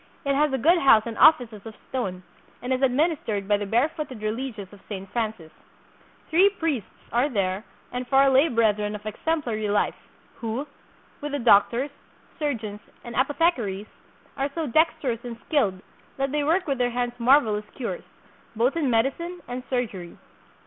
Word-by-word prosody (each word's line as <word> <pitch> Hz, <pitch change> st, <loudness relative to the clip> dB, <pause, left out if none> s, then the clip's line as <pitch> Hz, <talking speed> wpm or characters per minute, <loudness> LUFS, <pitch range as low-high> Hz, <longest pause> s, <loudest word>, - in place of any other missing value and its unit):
It 280 Hz, -, +2 dB
has 295 Hz, +1 st, +2 dB
a 265 Hz, -, +1 dB
good 335 Hz, +8 st, +4 dB
house 225 Hz, -7 st, +6 dB
and 230 Hz, -1 st, -5 dB
offices 245 Hz, -9 st, +5 dB
of 225 Hz, -1 st, -9 dB
stone, 185 Hz, -8 st, -3 dB, 0.4 s
and 250 Hz, +1 st, -2 dB
is 255 Hz, -, -1 dB
administered 265 Hz, -, +1 dB
by 205 Hz, 0 st, +3 dB
the 205 Hz, 0 st, -4 dB
barefooted 255 Hz, +1 st, -1 dB
religious 215 Hz, -3 st, -4 dB
of 205 Hz, -, -13 dB
Saint 195 Hz, -2 st, -6 dB
Francis. 215 Hz, -9 st, -3 dB, 0.8 s
Three 370 Hz, +5 st, +6 dB
priests 320 Hz, -, -2 dB, 0.2 s
are 245 Hz, +5 st, +2 dB
there 195 Hz, -4 st, -1 dB, 0.3 s
and 250 Hz, 0 st, -4 dB
four 270 Hz, +2 st, +5 dB
lay 270 Hz, +4 st, +5 dB
brethren 210 Hz, -4 st, +1 dB
of 210 Hz, 0 st, -9 dB
exemplary 220 Hz, -3 st, -2 dB
life, 205 Hz, -, +1 dB, 0.4 s
who, 230 Hz, +4 st, -3 dB, 0.6 s
with 295 Hz, 0 st, -5 dB
the -, -, +1 dB
doctors, 240 Hz, +3 st, +4 dB, 0.5 s
surgeons, 225 Hz, -9 st, -3 dB, 0.2 s
and 235 Hz, -1 st, -8 dB
apothecaries, 260 Hz, -, +1 dB, 0.5 s
are 275 Hz, +1 st, 0 dB
so 325 Hz, -2 st, -1 dB
dex 310 Hz, +5 st, +4 dB
terous 235 Hz, -4 st, -2 dB
and 240 Hz, -2 st, -6 dB
skilled 200 Hz, -, +1 dB, 0.3 s
that 270 Hz, 0 st, -1 dB
they 295 Hz, 0 st, 0 dB
work 335 Hz, +6 st, +2 dB
with 275 Hz, -3 st, -1 dB
their 245 Hz, 0 st, +2 dB
hands 245 Hz, 0 st, -2 dB
mar 260 Hz, +5 st, +7 dB
velous 210 Hz, -5 st, -3 dB
cures, 270 Hz, -, -4 dB, 0.5 s
both 240 Hz, +6 st, +2 dB
in 305 Hz, -5 st, +1 dB
medicine 305 Hz, +10 st, 0 dB
and 245 Hz, +1 st, -4 dB
surgery." 215 Hz, -9 st, -3 dB
245 Hz, 165 wpm, -25 LUFS, 215-285 Hz, 0.8 s, mar